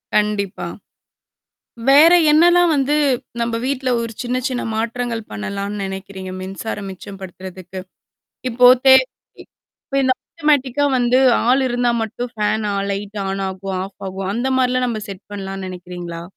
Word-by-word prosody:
கண்டிப்பா. 210 Hz, -2 st, 0 dB, 1.2 s
வேற 295 Hz, +5 st, +8 dB, 0.2 s
என்னாலாம் 345 Hz, +2 st, +5 dB
வந்து 280 Hz, +2 st, +1 dB, 0.5 s
நம்ப 230 Hz, 0 st, -1 dB
வீட்ல 265 Hz, -2 st, -1 dB
ஒரு 230 Hz, -1 st, -4 dB
சின்ன 250 Hz, +1 st, -2 dB
சின்ன 250 Hz, -1 st, -3 dB
மாற்றங்கள் 230 Hz, 0 st, -2 dB
பண்ணலான்னு 200 Hz, -, -4 dB
நெனைக்கிறீங்க? 190 Hz, -1 st, -6 dB
மின்சாரம் 195 Hz, +1 st, -5 dB
மிச்சம் 195 Hz, +1 st, -10 dB
படுத்துறதுக்கு? 185 Hz, 0 st, -8 dB, 0.7 s
இப்போ 245 Hz, +2 st, +5 dB, 0.2 s
தே 265 Hz, -, +10 dB, 1.0 s
இப்ப -, -, 0 dB
இந்த 260 Hz, 0 st, +3 dB
ஆட்டோமேட்டிக்கா 290 Hz, -3 st, +1 dB
வந்து, 245 Hz, +1 st, +3 dB, 0.3 s
ஆள் 265 Hz, +2 st, +4 dB
இருந்தா 245 Hz, 0 st, +1 dB
மட்டும் 235 Hz, +2 st, -4 dB
ஃபேன் 215 Hz, 0 st, 0 dB
ஆ -, -, -1 dB, 0.2 s
லைட் 205 Hz, +1 st, -4 dB
ஆன் 195 Hz, 0 st, -2 dB
ஆகும், 190 Hz, 0 st, -5 dB
ஆஃப் 195 Hz, -, -12 dB
ஆகும். 190 Hz, 0 st, -5 dB
அந்த 245 Hz, +3 st, -1 dB
மாரிலாம் 255 Hz, 0 st, +2 dB
நம்ப 220 Hz, -2 st, -3 dB
செட் 195 Hz, 0 st, -9 dB
பண்ணலான்னு 195 Hz, -1 st, -5 dB
நெனைக்கிறீங்களா? 175 Hz, -2 st, -7 dB
215 Hz, 135 wpm, -19 LUFS, 195-250 Hz, 1.2 s, தே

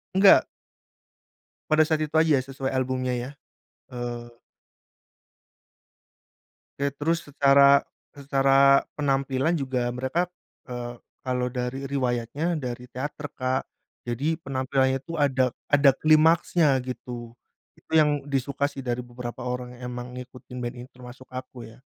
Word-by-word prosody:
Enggak. 195 Hz, +1 st, +7 dB, 1.2 s
Pada 155 Hz, 0 st, +5 dB
saat 155 Hz, 0 st, +1 dB
itu 150 Hz, -, -14 dB
aja 160 Hz, -2 st, +4 dB
ya -, -, +1 dB
sesuai 135 Hz, 0 st, -4 dB
albumnya, 130 Hz, -1 st, -1 dB
ya, 120 Hz, +2 st, -4 dB, 0.6 s
eee. 120 Hz, -1 st, -6 dB, 2.4 s
Ya, 140 Hz, 0 st, 0 dB
terus 165 Hz, +4 st, -1 dB
secara 140 Hz, -1 st, +5 dB, 0.2 s
secara 140 Hz, -1 st, +4 dB, 0.2 s
penampilan 135 Hz, +2 st, +1 dB
juga 130 Hz, -5 st, -1 dB
mereka, 130 Hz, +8 st, -1 dB, 0.4 s
eee, 120 Hz, -1 st, -6 dB, 0.2 s
kalau 125 Hz, -1 st, -1 dB
dari 125 Hz, +2 st, -4 dB
riwayatnya 135 Hz, +5 st, -1 dB
dari 125 Hz, -2 st, -5 dB
teater 145 Hz, +3 st, -5 dB
Kak, 130 Hz, 0 st, -1 dB, 0.4 s
jadi 135 Hz, +7 st, -1 dB
penampilannya 130 Hz, 0 st, 0 dB
itu 165 Hz, +5 st, -7 dB
ada 130 Hz, -4 st, +1 dB, 0.2 s
ada 145 Hz, -1 st, +6 dB
klimaksnya 160 Hz, +2 st, +4 dB, 0.2 s
gitu. 120 Hz, -1 st, -7 dB, 0.5 s
Itu -, -, -28 dB
yang 150 Hz, -2 st, +4 dB
disuka, 140 Hz, 0 st, 0 dB
sih, 140 Hz, -2 st, -8 dB
dari 120 Hz, -1 st, -2 dB
beberapa 120 Hz, -1 st, -7 dB
orang 125 Hz, 0 st, -5 dB
emang 125 Hz, 0 st, -6 dB
ngikutin 125 Hz, 0 st, -11 dB
band 120 Hz, +1 st, -4 dB
ini 120 Hz, -, -9 dB
termasuk 125 Hz, +1 st, -13 dB
aku, 130 Hz, -1 st, -8 dB
ya. 115 Hz, -, -18 dB
130 Hz, 125 wpm, -26 LUFS, 125-145 Hz, 2.4 s, Enggak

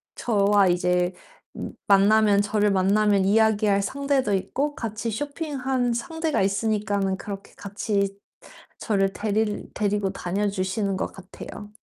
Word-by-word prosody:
저와 205 Hz, -3 st, +3 dB
이제 180 Hz, 0 st, +1 dB, 0.7 s
만나면 205 Hz, +1 st, +5 dB
저를 210 Hz, 0 st, +1 dB
음 -, -, +1 dB
만나면 200 Hz, +1 st, +3 dB
이야기할 210 Hz, -1 st, +3 dB
상대도 275 Hz, -4 st, 0 dB
있고 270 Hz, +10 st, -2 dB
같이 225 Hz, 0 st, -4 dB
쇼핑하는 265 Hz, -2 st, -2 dB
상대가 320 Hz, -, -1 dB
있으니까는 200 Hz, -1 st, 0 dB
그렇게 200 Hz, 0 st, -8 dB
같이 200 Hz, -1 st, -2 dB, 0.6 s
저를 195 Hz, -2 st, 0 dB
데릴 215 Hz, 0 st, -1 dB
데리고 205 Hz, -2 st, 0 dB
다녀 200 Hz, +2 st, -2 dB
주시는 195 Hz, 0 st, -2 dB
것 -, -, -3 dB
같아요. 200 Hz, +2 st, -10 dB
205 Hz, 290 characters per minute, -24 LUFS, 195-220 Hz, 0.7 s, 만나면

